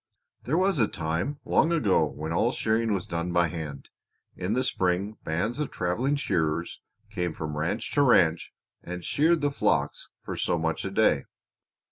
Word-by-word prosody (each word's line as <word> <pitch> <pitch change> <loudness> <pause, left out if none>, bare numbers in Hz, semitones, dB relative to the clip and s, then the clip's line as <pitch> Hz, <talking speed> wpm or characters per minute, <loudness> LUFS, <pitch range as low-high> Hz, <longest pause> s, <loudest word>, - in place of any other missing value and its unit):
"There 150 +7 +1
was 190 -3 +2
a 110 - +4
time 85 - -2
long 165 - +3
ago 100 - +3
when 80 +2 -5
all 115 +8 +2
shearing 115 -2 0
was 95 - -3
done 85 +1 -3
by 85 -1 +3
hand. 75 -4 -6 0.5
In 90 +4 -2
the 130 +2 +1
spring 95 -1 -1
bands 110 - -1
of 150 - -1
traveling 115 +11 0
shearers 85 - -1 0.3
came 90 -2 -2
from 75 -1 -5
ranch 85 +9 -2
to 145 - +3
ranch 85 - +4 0.3
and 90 0 -7
sheared 160 +2 +3
the 145 0 +1
flocks - - 0
for - - -5
so - - 0
much 80 -1 -1
a - - -1
day. 95 -8 +2
90 Hz, 170 wpm, -27 LUFS, 80-125 Hz, 0.5 s, a